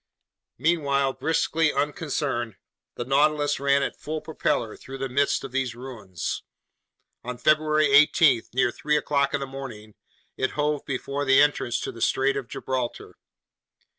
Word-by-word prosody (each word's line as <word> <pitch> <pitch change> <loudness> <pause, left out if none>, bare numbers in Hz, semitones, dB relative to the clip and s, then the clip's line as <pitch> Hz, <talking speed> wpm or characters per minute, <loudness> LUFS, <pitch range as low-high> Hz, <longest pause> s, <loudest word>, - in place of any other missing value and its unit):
Meanwhile, 140 -5 +1
briskly 160 -1 +1
unconcerned, 140 - -2 0.4
the 120 - -4
Nautilus 145 +2 +2
ran 140 0 +3
at - - -4
full 155 +1 -3
propeller 120 -8 -2
through 135 +1 -9
the 135 0 -3
midst 140 +2 +1
of 135 - -7
these 130 -2 -1
ruins. 115 -9 -5 0.8
On 125 0 -5
February 155 +3 +3
18, 145 -3 +6
near 125 -1 +2
three 150 +4 0
o'clock 140 -1 +1
in - - -1
the 135 - -3
morning, 125 -6 -9 0.4
it 130 - -1
hove 150 -1 0
before 140 +1 -3
the 135 -1 +5
entrance 145 -5 +2
to - - -4
the 115 - -11
Strait 135 +1 +2
of 135 -3 -4
Gibraltar. 125 -2 -4
140 Hz, 145 wpm, -25 LUFS, 130-150 Hz, 0.8 s, 18